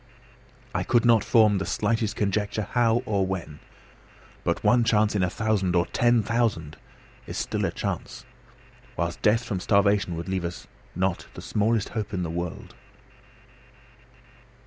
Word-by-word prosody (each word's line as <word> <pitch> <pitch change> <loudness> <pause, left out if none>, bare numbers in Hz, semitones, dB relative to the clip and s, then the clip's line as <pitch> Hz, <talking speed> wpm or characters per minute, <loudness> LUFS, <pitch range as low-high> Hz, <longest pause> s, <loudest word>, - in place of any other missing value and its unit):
I - - 0
could 120 -1 +2
not 115 -3 +5
form 110 -4 +4
the 95 - -3
slightest 110 0 0
conjecture 105 +1 -1
how 120 0 +2
or 100 -5 +1
when. 90 -5 -4 0.8
But - - -1
one 120 -1 +4
chance 110 -2 +2
in 100 - +1
a 90 - +2
thousand, 100 -4 0
or 85 0 +3
ten 120 -2 +2
thousand, 105 -9 -1 0.5
is - - -5
still - - -1
a - - -1
chance; - - -5 0.7
whilst 85 -2 -2
death 110 +3 +3
from 100 -5 -3
starvation 100 -2 +2
would 85 +1 -6
leave 95 -1 -2
us 85 0 -5 0.3
not 95 0 -1
the - - -8
smallest 110 0 0
hope 105 -3 -4
in 90 - -1
the 80 - -3
world. 85 -5 -5
105 Hz, 150 wpm, -25 LUFS, 90-115 Hz, 0.8 s, not